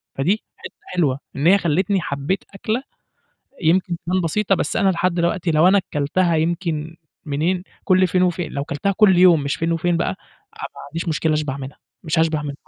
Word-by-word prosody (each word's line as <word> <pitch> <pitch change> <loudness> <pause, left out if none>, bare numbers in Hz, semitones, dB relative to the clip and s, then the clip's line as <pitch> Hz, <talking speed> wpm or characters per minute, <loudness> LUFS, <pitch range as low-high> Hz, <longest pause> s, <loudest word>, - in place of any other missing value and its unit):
فدي 185 +11 0
حتّة - - -10
حلوة 145 -7 0 0.2
إن 145 +5 +1
هي 195 +2 +7
خلِّتني 180 +3 +1
حبيت 140 +6 -2
أكلة، 220 +6 -2 0.8
يمكن 175 +1 +2
تبان 185 +1 +1
بسيطة، 195 +4 +1
بس 155 - -2
أنا 195 - +3
لحد 180 0 +1
دوقتي 170 0 0
لو 155 +3 +4
أنا 195 0 +4
كلتها 165 +4 +1
يمكن 165 -1 -2 0.3
منين 165 +6 -1 0.2
كُلّ 185 -1 +4
فين 180 +1 +2
وفين، 175 -1 -1
لو 140 0 -3
كلتها 160 +6 -2
كُلّ 195 -4 +5
يوم 175 -5 +6
مش 140 - -1
فين 165 +1 -1
وفين 170 +1 +1
بقى، 170 - 0
أنا - - -4 0.6
ما - - -10
عنديش 165 +3 -5
مشكلة 160 0 0
أشبع 150 -3 -2
منها، 135 +1 -8 0.3
مش 160 0 0
هاشبع 160 -2 +1
منها 145 -1 -5
170 Hz, 190 wpm, -21 LUFS, 150-185 Hz, 0.8 s, هي